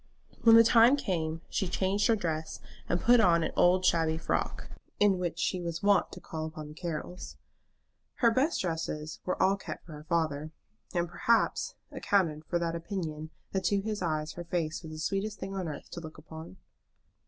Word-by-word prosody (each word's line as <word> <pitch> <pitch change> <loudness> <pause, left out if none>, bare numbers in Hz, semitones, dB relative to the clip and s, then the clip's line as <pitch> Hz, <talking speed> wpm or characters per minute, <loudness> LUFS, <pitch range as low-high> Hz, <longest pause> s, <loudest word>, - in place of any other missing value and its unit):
When 225 -1 +8
the 230 - +9
time 230 +4 +6
came 165 - -2
she 190 - -1
changed 195 +3 +1
her 230 - +4
dress, 160 -6 -3 0.3
and 175 - +1
put 240 +6 +5
on 170 -5 +4
an - - -1
old 185 +1 +4
shabby 160 -2 +2
frock, - - -2 0.3
in 200 -3 +4
which 175 -2 -2
she 185 - -1
was 170 0 -4
wont 200 -2 +3
to - - -8
call 160 -1 -5
upon 155 -2 -8
the - - -10
Carrolls. 170 +2 -6 0.8
Her 235 -2 +4
best 275 +8 +1
dresses 160 -3 -3
were 185 - -2
all 195 +1 +3
kept - - -8
for 165 - -12
her 150 0 -10
father, 155 -3 0 0.4
and, 175 -1 0
perhaps, 235 - +1 0.2
accounted 160 -6 0
for 175 - 0
that 170 -1 -1
opinion 165 -3 -4 0.2
that 190 -1 -2
to 200 - +2
his 215 0 -3
eyes 155 -3 -1
her 175 - -7
face 170 -2 -2
was 160 -3 -9
the 155 - -7
sweetest 195 +6 -2
thing 195 0 -5
on 190 -3 -3
earth 150 -2 -7
to - - -6
look 160 -2 -10
upon. 160 - -10
175 Hz, 190 wpm, -30 LUFS, 160-195 Hz, 0.8 s, the